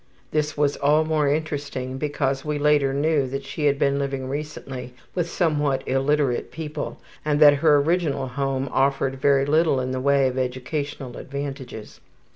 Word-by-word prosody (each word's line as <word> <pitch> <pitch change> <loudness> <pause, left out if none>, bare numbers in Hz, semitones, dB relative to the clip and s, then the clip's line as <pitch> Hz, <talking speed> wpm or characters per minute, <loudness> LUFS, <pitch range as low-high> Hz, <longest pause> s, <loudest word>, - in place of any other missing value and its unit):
(This 150 -1 -1
was 145 -1 +1
all 150 +2 +3
the 155 - -6
more 155 -2 +2
interesting 140 -3 -2
because 140 -2 -1
we 150 -1 -2
later 145 -2 +3
knew 145 0 +1
that 135 +2 -4
she 145 +2 -1
had 140 -1 +2
been 140 0 +1
living 135 -2 -3
recently 135 -3 -6 0.2
with 175 -2 -1
somewhat 145 -6 0
illiterate 135 -1 +1
people 155 -2 -5 0.2
and 150 -1 +1
that 145 -2 +8
her 155 -2 +6
original 145 -3 0
home 135 0 -1
offered 135 0 +1
her 135 - -10
very 140 -1 +4
little 155 -1 +3
in 130 0 -2
the 130 0 -2
way 140 0 +3
of 130 0 -2
educational 130 +1 -4
advantages.) 135 -5 -7
140 Hz, 170 wpm, -24 LUFS, 135-150 Hz, 0.2 s, that